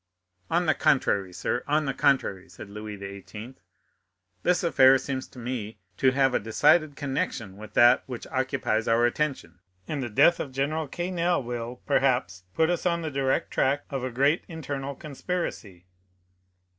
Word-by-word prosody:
"On 175 +1 +1
the 155 - +3
contrary, 100 -8 +1
sir,—on 145 - -1
the 135 - -1
contrary," 115 -11 +1
said 95 +2 -11
Louis 105 0 -7
XVIII., 100 +4 -9 0.9
"this 180 0 +1
affair 135 -5 +6
seems 130 0 -4
to - - -18
me 120 -3 -5 0.2
to 130 - +4
have 135 0 +2
a - - +2
decided 150 +7 +3
connection 135 -8 -3
with 105 +1 -12
that 120 +1 +6
which 125 -3 -6
occupies 130 -4 -1
our 115 +1 +4
attention, 120 - -2 0.3
and 145 -3 -3
the 120 - -3
death 145 +10 +4
of 140 - -4
General 145 +4 -1
Quesnel 175 0 -1
will, 120 0 -6
perhaps, 95 -9 +1
put 160 +1 +3
us 175 +1 -1
on 170 -1 0
the 155 - -3
direct 135 -1 0
track 140 +2 +1
of 135 -2 -3
a 130 - -2
great 140 +6 +2
internal 140 -4 -5
conspiracy." 140 - -5
130 Hz, 155 wpm, -26 LUFS, 115-150 Hz, 0.9 s, affair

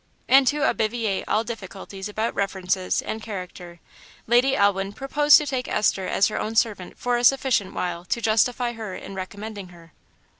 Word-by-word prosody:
And 270 0 +6
to 295 +1 +1
obviate 220 -2 -1
all 220 - +1
difficulties 195 -3 -7
about 220 +2 -2
references 190 -1 -1
and 220 - -5
character, 180 -4 -8 0.5
Lady 245 +4 +3
Elwin 200 -2 +1
proposed 290 +4 +5
to 300 - -1
take 260 -2 -3
Esther 195 -3 0
as 195 - +3
her - - -3
own 220 +1 -3
servant 210 -6 0
for 245 -1 0
a 240 - -2
sufficient 255 -6 +2
while 175 -1 -3
to 235 - -1
justify 235 +2 +1
her 220 -5 -7
in 195 - -9
recommending 200 +1 -7
her. 170 -2 -17
215 Hz, 165 wpm, -24 LUFS, 190-240 Hz, 0.5 s, And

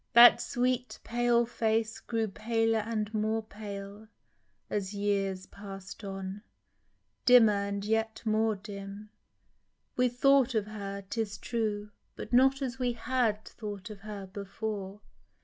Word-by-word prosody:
That 240 +1 +9
sweet 250 0 -1
pale 240 0 +2
face 225 -1 0
grew 225 -1 -1
paler 225 +2 +1
and 215 -1 -2
more 220 +1 0
pale 205 0 -8 0.6
As 200 -1 -3
years 195 -2 0
pass'd 195 0 -9
on, 195 0 -5 0.8
dimmer 240 -4 +7
and 200 0 -3
yet 220 +1 0
more 220 0 +2
dim; 200 +1 -8 0.8
We 250 0 +3
thought 260 0 +4
of 215 -2 +2
her, 200 -2 -6
'tis 210 -1 -2
true, 210 -2 -2 0.2
but - - -8
not 270 +2 +5
as 260 0 -4
we 245 -1 +1
Had 230 -3 0
thought 205 -2 -7
of 210 - -9
her 205 -1 -7
before. 200 +1 -5
215 Hz, 130 wpm, -30 LUFS, 200-230 Hz, 0.8 s, That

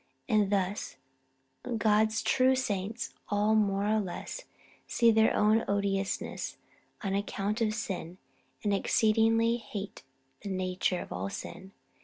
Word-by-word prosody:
And, 210 -4 +2
thus, 195 0 -1 0.8
God's 220 +1 +2
true 260 0 +4
saints 220 -2 -2 0.2
all 210 +1 +2
more 200 -2 +2
or 215 +1 +2
less 185 -4 -5 0.4
see 235 -1 +4
their 220 0 +4
own 215 +2 +4
odiousness 200 -1 -1 0.5
on 195 -1 -1
account 205 +2 -2
of 215 -1 +1
sin, 185 -6 -4 0.5
and 205 -2 +1
the - - +3
exceedingly 225 +2 +3
hateful 205 - -7 0.4
nature 185 -2 -1
of - - -9
all 95 +2 -3
sin. 190 - -8
210 Hz, 125 wpm, -30 LUFS, 195-220 Hz, 0.8 s, true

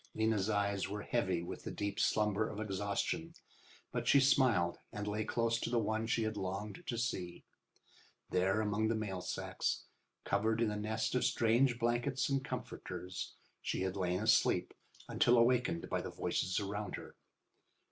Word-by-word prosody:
Lena's 110 -2 +1
eyes 100 -2 0
were 105 +1 -4
heavy 95 -8 0
with - - -7
the - - -4
deep 100 -1 -3
slumber 105 0 +2
of 105 - -6
exhaustion, 105 - -2 0.6
but - - -2
she 140 - +7
smiled 130 -10 +3
and 105 0 -4
lay 105 +1 -1
close 115 +1 +1
to - - -2
the 120 - +1
one 110 0 0
she 115 0 +1
had 110 -1 -2
longed 100 - -4
to 120 - -2
see. 90 -7 -3 0.9
There 95 +4 +2
among 105 +1 +1
the 115 - +1
mail 100 -4 -3
sacks, 90 - -2 0.4
covered 110 +3 +1
in 115 -2 +2
a - - -2
nest 110 +2 -1
of 125 - +2
strange 120 +1 +3
blankets 120 +4 0
and 135 -1 +1
comforters, 95 -7 -5 0.3
she - - -2
had 95 -1 -2
lain 90 -1 0
asleep 110 -5 +3 0.3
until 120 0 +4
wakened 120 -8 +1
by - - -1
the - - -5
voices 90 +2 -1
around 105 0 -3
her. - - -10
110 Hz, 165 wpm, -35 LUFS, 100-115 Hz, 0.9 s, she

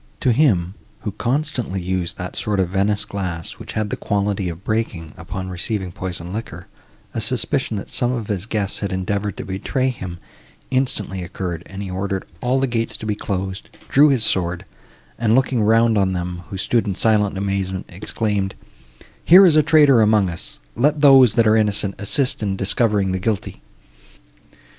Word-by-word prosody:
To 125 - +3
him, 100 - +2 0.3
who 105 - -3
constantly 125 -4 -2
used 90 -1 -2
that 90 0 -6
sort 105 -2 -1
of 90 -2 +1
Venice 100 +2 +1
glass, 90 -4 -5
which - - -8
had 110 -1 -2
the - - 0
quality 100 -2 -1
of 85 +2 -8
breaking, 100 -8 -2
upon 95 +3 -6
receiving 95 +1 -3
poisoned 90 0 -6
liquor, 110 +2 -6 0.5
a - - -2
suspicion, 110 - 0
that 100 - -7
some 125 -1 +1
of 120 -4 -3
his 100 -1 -3
guests 105 -3 -2
had 100 - -3
endeavoured 100 +2 -2
to - - -6
betray 130 +7 -1
him, 95 -8 -6 0.5
instantly 115 -8 -1
occurred, 90 -1 -5
and 100 +1 -7
he 95 - -6
ordered 95 +1 -3 0.2
all 125 +2 +1
the 135 - +2
gates 115 -3 -2
to - - -8
be 105 - 0
closed, 95 -1 -4 0.2
drew 145 +2 +6
his 130 -5 +2
sword, 90 -4 0 0.5
and, 115 -1 +3
looking 130 -2 +2
round 115 0 +4
on 95 -1 +1
them, 90 0 -4
who 100 - -5
stood 110 +3 +1
in 100 - -1
silent 105 -2 +2
amazement, 95 -1 -2
exclaimed, 100 +1 -2 0.7
"Here 185 +4 +8
is 165 -4 +5
a 155 - +7
traitor 145 -5 +5
among 105 -4 +3
us; 85 - -6 0.2
let 145 +5 +1
those, 135 -5 +7
that 115 - +4
are 110 0 +5
innocent, 105 -2 +1
assist 125 +6 +1
in 100 -2 -1
discovering 100 0 +1
the 95 - -1
guilty." 105 +1 -3
100 Hz, 175 wpm, -21 LUFS, 95-115 Hz, 0.7 s, Here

